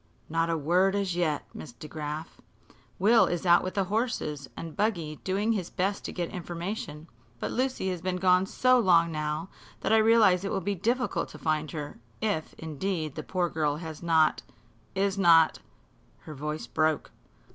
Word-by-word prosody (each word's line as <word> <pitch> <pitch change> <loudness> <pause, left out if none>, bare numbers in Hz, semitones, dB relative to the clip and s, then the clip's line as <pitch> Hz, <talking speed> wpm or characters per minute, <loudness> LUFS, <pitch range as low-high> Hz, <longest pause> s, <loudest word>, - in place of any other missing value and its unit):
"Not 165 +1 0
a 165 - +1
word 180 +6 +2
as 195 -3 -1
yet, 160 -4 0
Miss 145 - -9
DeGraf, 150 +4 -7 0.6
Will 225 +5 +5
is 175 +1 -2
out 175 -1 +6
with 185 - -4
the 195 - +2
horse 190 - -2
and 165 -2 -7
buggy 170 -8 -1
doing 200 +4 0
his 195 -6 -2
best 195 +2 -1
to - - -4
get 175 -2 -3
information. 170 -3 -5 0.3
But - - -3
Lucy 255 -6 -1
has 180 -2 -4
been 185 +1 -1
gone 180 +1 +3
so 255 +3 +3
long 170 -6 +4
now 155 +2 -3 0.3
that - - +1
I - - +7
realize 220 -5 +5
it 195 - -2
will - - 0
be 200 +2 -1
difficult 240 +7 -1
to - - -11
find 155 -1 -1
her, 150 -2 -6 0.2
if, 205 -8 -2
indeed, 160 0 -3
the 155 - -5
poor 180 +3 -1
girl 150 -3 0
has 160 -1 -7
not 160 -2 +3 0.5
is 195 0 0
not 165 -3 +5 0.3
" - - -34
Her 155 - -9
voice 150 +2 -4
broke. 155 -2 0
175 Hz, 180 wpm, -28 LUFS, 155-195 Hz, 0.6 s, I